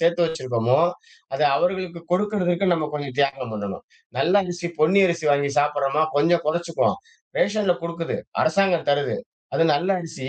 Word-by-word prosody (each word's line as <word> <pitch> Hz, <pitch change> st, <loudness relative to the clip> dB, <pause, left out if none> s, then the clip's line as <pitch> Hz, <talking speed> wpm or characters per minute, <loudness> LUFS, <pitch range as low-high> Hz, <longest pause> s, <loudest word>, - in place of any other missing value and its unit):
சேர்த்து 170 Hz, +1 st, +3 dB
வச்சிருக்கோமோ 130 Hz, -5 st, 0 dB, 0.5 s
அத -, -, -3 dB, 0.2 s
அவர்களுக்கு 180 Hz, 0 st, -1 dB
கொடுக்கறதற்கு 185 Hz, -2 st, +1 dB
நம்ம 155 Hz, -2 st, -2 dB
கொஞ்சம் 140 Hz, -3 st, -5 dB
தியாகம் 135 Hz, -4 st, 0 dB
பண்ணணும். 100 Hz, -2 st, -5 dB, 0.3 s
நல்ல 180 Hz, -, +2 dB
அரிசி 175 Hz, -1 st, -5 dB
பொன்னி 185 Hz, +6 st, +5 dB
அரிசி 170 Hz, -2 st, -2 dB
வாங்கி 140 Hz, 0 st, +1 dB
சாப்பிட்றோமா 145 Hz, +1 st, +1 dB
கொஞ்சம் 165 Hz, +3 st, +3 dB
கொறச்சுக்குவோம் 165 Hz, +1 st, 0 dB, 0.4 s
ரேஷன்ல 205 Hz, -3 st, +2 dB
குடுக்குது, 170 Hz, 0 st, -3 dB, 0.3 s
அரசாங்கம் 175 Hz, 0 st, +2 dB
தருது, 145 Hz, +7 st, 0 dB, 0.4 s
அது 165 Hz, -, +3 dB
நல்லரிச்சி 165 Hz, -5 st, -2 dB
165 Hz, 135 wpm, -23 LUFS, 145-175 Hz, 0.5 s, பொன்னி